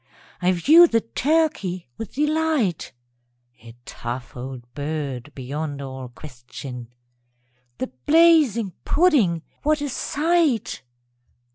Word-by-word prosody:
_) - - -43 0.4
I 180 +1 +3
view 310 - +7
the 230 -6 +1
turkey 230 - 0
with 225 - -8
delight, 300 - 0 0.7
(A 115 0 -13
tough 120 +1 -6
old 130 0 -7
bird 145 -3 -4
beyond 145 +2 -5
all 130 -2 -7
question!) 125 -2 -10 0.9
The - - -4 0.2
blazing 300 - +5
pudding 245 - +3 0.2
what 305 +1 +2
a 290 0 -3
sight! 300 - 0
185 Hz, 105 wpm, -23 LUFS, -, 0.9 s, view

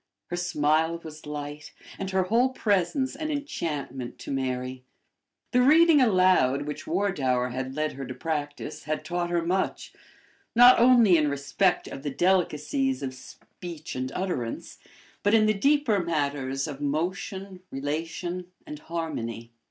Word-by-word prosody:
Her - - 0
smile 160 -1 +1
was 155 -1 -10
light, 150 0 -6 0.3
and 195 - -3
her 190 -1 +2
whole 230 +7 +3
presence 235 - 0
an 310 -1 -4
enchantment 150 - -4
to - - -6
Mary. 130 -1 -3 0.7
The 250 - +4
reading 310 +2 +6
aloud 185 - +4
which 150 +1 -6
Wardour 140 -10 0
had 130 +1 -4
led 155 0 -1
her 135 0 -6
to 130 - -6
practice 145 0 -4
had 155 0 -3
taught 175 +1 -2
her 170 -1 0
much, 185 +2 -1 0.6
not 245 +1 +8
only 235 -7 +6
in 150 -2 +2
respect 145 +7 0
of - - -7
the 145 - -3
delicacies 185 - +1
of 130 -1 -3
speech 165 +5 -10
and 130 0 -3
utterance, 175 -12 -4 0.4
but 205 +2 +3
in 215 -1 +5
the 215 - +3
deeper 275 -1 +2
matters 140 -4 -1
of 145 -2 -7
motion, 185 +6 -3
relation, 165 +6 -4 0.2
and 150 - -8
harmony. 120 -9 -5
165 Hz, 145 wpm, -26 LUFS, 140-195 Hz, 0.7 s, not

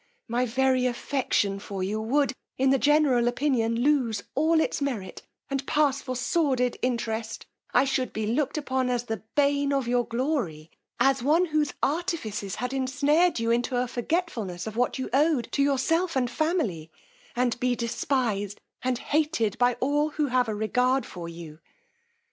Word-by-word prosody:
My 245 +2 0
very 260 +1 +2
affection 240 -5 0
for 195 -1 -5
you 210 +3 -2
would, 265 +4 +1 0.2
in 265 0 +3
the 270 - +3
general 290 -5 +3
opinion, 240 -3 +1
lose 250 -7 +1
all 315 +3 +3
its 315 - 0
merit, 240 -9 -3 0.3
and 275 -1 -2
pass 290 -3 +2
for 255 -1 -4
sordid 255 -2 +1
interest: 230 -2 -2 0.3
I 255 - +4
should 260 -3 -1
be 215 0 -3
looked 260 +8 0
upon 260 -3 -1
as 245 -1 0
the 225 -4 -4
bane 285 0 +2
of 275 -3 0
your 245 0 +2
glory; 235 - -2 0.3
as 270 +1 +3
one 310 +8 +3
whose 305 -3 0
artifices 245 - -2
had 250 +3 -3
ensnared 285 +5 +2
you 230 0 0
into 245 +2 0
a 250 +1 +1
forgetfulness 240 - -2
of 220 -1 -6
what 245 +3 0
you 260 - -3
owed 290 -2 +2
to - - 0
yourself 325 +5 +1
and 250 -2 +1
family, 290 - -1 0.5
and 245 -1 0
be 250 0 +1
despised 235 -4 -1 0.2
and 255 -1 0
hated 290 -8 0
by 245 0 +3
all 290 +4 +1
who 300 0 -1
have 250 -2 +2
a 215 - -2
regard 250 +4 +1
for 170 -2 -7
you. 165 -2 -10
255 Hz, 165 wpm, -26 LUFS, 230-285 Hz, 0.5 s, I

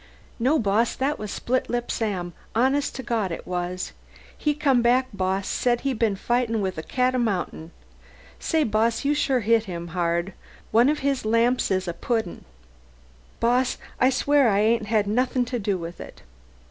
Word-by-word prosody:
"No, 265 +7 +3
boss, 220 +1 +1
that 275 +3 -1
was 210 - -5
Splitlip 240 0 -1
Sam, 185 -6 -2 0.2
honest 265 +5 +1
to 260 - -5
Gawd 225 -6 -1
it 165 - -6
was. 180 0 -3 0.4
He 295 -1 0
come 275 -5 +3
back, 250 +2 +3
boss; 190 0 -1
said 240 -1 +1
he'd 270 -4 -2
been 220 -4 +2
fightin' 235 +2 0
with 190 -4 -2
a - - -2
cat 255 +8 0
o' 255 - +1
mountain! 185 -7 -2 0.7
Say, 320 -2 +1
boss, 225 +2 +1
you 290 - +3
sure 270 -4 +1
hit 225 +1 +3
him 170 -3 -6
hard. 170 +1 -1 0.4
One 235 +5 +5
of 300 - 0
his 275 -2 +1
lamps 230 +3 +2
is 185 -1 0
a 175 - -2
pudding! 220 0 -3 0.9
Boss, 245 +2 +2 0.2
I'll 255 - +5
swear 275 0 +3
I 200 0 +2
ain't 220 0 +2
had 215 -1 +2
nothin' 250 +4 +1
to 245 0 -3
do 200 -2 0
with 170 0 -7
it." - - -11
230 Hz, 175 wpm, -24 LUFS, 195-255 Hz, 0.9 s, One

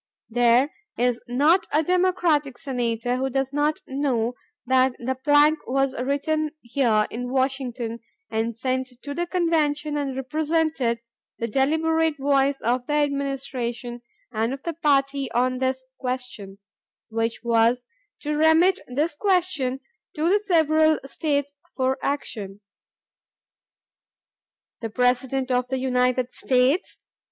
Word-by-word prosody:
There 245 +4 +3 0.2
is 245 0 +1
not 295 +9 +3
a 310 +2 +3
Democratic 345 -6 +1
Senator 245 -3 -1
who 265 +1 -1
does 270 +1 -1
not 295 +1 +1
know 260 -4 -1 0.3
that 260 0 +3
the 255 +2 -2
plank 290 +3 +4
was 270 +1 +1
written 290 +4 -1
here 235 -4 +2
in 245 +2 -4
Washington 260 -3 -1 0.3
and 225 +1 -2
sent 255 +1 -1
to 285 - -5
the 345 +3 -2
convention 305 -4 0
and 275 -2 -2
represented 300 -2 0 0.4
the 230 - -2
deliberate 320 +5 +1
voice 275 0 +2
of 245 +2 0
the 295 - -1
administration 275 -4 -2 0.3
and 225 +3 -1
of 270 - -15
the 335 - -3
party 275 -4 +1
on 255 +1 +1
this 260 0 -1
question, 250 -6 -5 0.5
which 225 +1 -2
was 235 +1 +2 0.4
to 300 0 -2
remit 320 +5 +4
this 295 +7 0
question 320 -7 0 0.3
to 310 +2 0
the 400 +4 +4
several 315 -5 +3
States 285 0 -2 0.2
for 260 0 +1
action.... 210 -8 -3 2.2
"The 225 - -4
President 255 +3 +1
of 250 0 +1
the 265 +1 -1
United 255 -1 +1
States 260 +7 +1
270 Hz, 125 wpm, -24 LUFS, 245-300 Hz, 2.2 s, plank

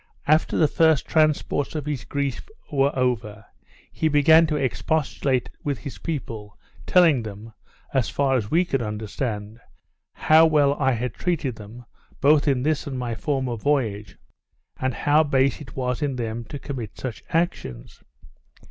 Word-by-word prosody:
After 155 +2 +2
the 155 - +4
first 160 -3 +3
transports 155 -2 +1
of 150 -3 -3
his 145 -7 -4
grief 140 - -3 0.2
were 140 -1 +2
over, 110 -5 -1 0.5
he 160 - 0
began 160 +2 +5
to 155 - -1
expostulate 135 -1 -1
with 140 -3 -1
his 130 +5 -8
people, 115 -10 -5 0.3
telling 165 -8 +5
them 110 +1 -9 0.4
(as 130 -3 +1
far 135 -2 +1
as 110 -5 -1
we 175 +3 +3
could 135 -7 -1
understand) 105 0 -4 0.5
how 160 +1 +5
well 145 -3 +3
I 135 -2 +2
had 120 +2 -3
treated 150 -10 -2
them, 110 +4 -11 0.3
both 145 0 +4
in 130 -3 +2
this 155 0 0
and 135 -2 -4
my 120 -2 -3
former 130 0 -2
voyage, 110 -7 -1 0.6
and 130 -2 -1
how 145 +6 +3
base 135 -2 +1
it 130 - -11
was 125 -1 -2
in 145 -3 -1
them 115 -1 -4
to 145 - -7
commit 125 -7 -7
such 125 -4 -6
actions. 65 - -3
135 Hz, 155 wpm, -24 LUFS, 115-150 Hz, 0.6 s, began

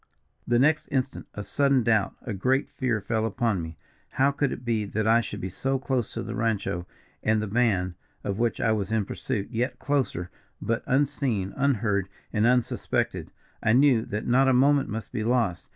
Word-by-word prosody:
The 120 - +3
next 150 +4 +3
instant 130 -1 -2
a 105 - -4
sudden 140 +3 +2
doubt, 110 -3 +2
a 120 - -4
great 130 +8 0
fear 120 -5 -1
fell 110 +2 -1
upon 110 -3 0
me. 80 -1 -7 0.4
How 135 +2 +3
could 140 -1 0
it 125 - -6
be 115 -2 +1
that 105 +1 -2
I 115 +1 +5
should 105 -2 -6
be 95 0 -4
so 135 +8 -1
close 130 -3 -1
to - - -3
the - - -5
rancho 100 -6 -1 0.3
and 110 0 +2
the 105 - -1
band, 100 -5 +1 0.3
of 100 +1 -3
which 120 -1 0
I 115 - +2
was 105 -2 -1
in 110 -3 +1
pursuit, 105 0 -4
yet 125 +2 -1
closer, 130 -11 -1 0.3
but 115 0 -1
unseen, 130 -7 0
unheard 105 -8 +1 0.2
and 105 +1 +3
unsuspected. 125 -1 0 0.3
I 110 - +3
knew 130 -3 +5
that 105 +1 -3
not 130 +3 +4
a 130 - +4
moment 140 +2 +4
must 110 +1 -5
be 110 - -2
lost. 115 -7 0
115 Hz, 190 wpm, -26 LUFS, 105-130 Hz, 0.4 s, I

